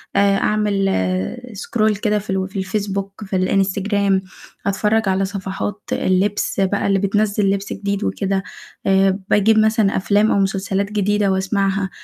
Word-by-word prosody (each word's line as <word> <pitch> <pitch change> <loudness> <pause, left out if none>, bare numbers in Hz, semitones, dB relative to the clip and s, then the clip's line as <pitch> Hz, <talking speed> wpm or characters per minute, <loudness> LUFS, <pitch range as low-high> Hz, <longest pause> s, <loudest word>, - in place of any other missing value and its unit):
آآ، 200 0 +4
أعمل 205 -2 +1 0.6
scroll 215 0 0
كده 210 -2 +1
في 210 - -13
ال 190 0 -1
في 195 0 -5
الفيسبوك، 195 +1 -3
في 195 -1 -4
الانستجرام، 195 +1 +1 0.4
أتفرّج 210 +1 +1
على 190 +1 +1
صفحات 195 +1 -4
اللبس 195 +2 0
بقى 195 +1 +1
اللي 195 -1 +2
بتنزّل 205 0 +1
لبس 200 0 -2
جديد 200 0 -3
وكده، 190 - -1 0.4
آآ، 195 0 +3
باجيب 215 +2 +4
مثلًا 215 -2 +2
أفلام 205 +3 +2
أو - - +2
مسلسلات 195 +1 -1
جديدة 205 -1 +1
وأسمعها، 195 0 0
200 Hz, 140 wpm, -19 LUFS, 195-210 Hz, 0.6 s, آآ